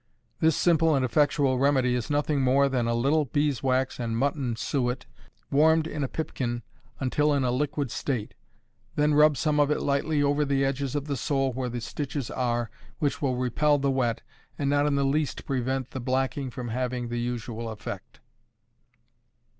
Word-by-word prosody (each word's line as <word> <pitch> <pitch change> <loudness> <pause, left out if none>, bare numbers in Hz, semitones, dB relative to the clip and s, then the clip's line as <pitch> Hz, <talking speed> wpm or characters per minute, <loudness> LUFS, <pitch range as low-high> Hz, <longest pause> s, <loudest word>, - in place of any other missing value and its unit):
_ - - -46 0.4
This 160 -2 +3
simple 165 -2 +3
and 130 -2 +2
effectual 135 0 +2
remedy 135 -2 +3
is 125 -2 -2
nothing 145 -1 +1
more 135 +2 +4
than 125 -4 0
a 115 - +1
little 145 +6 +2
beeswax 130 -2 0
and 115 -2 -2
mutton 135 -2 0
suet, 125 +1 -1 0.5
warmed 160 +2 +4
in 150 -2 -3
a - - 0
pipkin 120 -6 -3 0.4
until 145 +3 +1
in 140 - +1
a 125 - +1
liquid 140 0 -1
state. 120 -7 -3 0.6
Then 150 0 +3
rub 150 -1 +5
some 150 -1 +1
of 145 -1 +4
it 150 - +1
lightly 145 +1 +1
over 145 +1 +2
the 140 -1 +1
edges 135 0 -2
of 145 -1 -1
the 145 -2 -2
sole 135 0 0
where 125 0 -3
the 120 0 -4
stitches 140 +2 -4
are, 120 -2 -1 0.3
which 150 0 -1
will 130 -3 +1
repel 135 +4 +2
the 140 -1 +1
wet, 120 -4 0 0.3
and 140 -1 0
not 145 0 +3
in 145 - +1
the 140 0 +2
least 145 +1 -1
prevent 130 -1 -2
the 130 - -5
blacking 130 +2 -1
from 120 0 -6
having 125 0 -2
the 120 0 -2
usual 120 -1 -4
effect. 105 - -8
135 Hz, 180 wpm, -27 LUFS, 125-145 Hz, 0.6 s, rub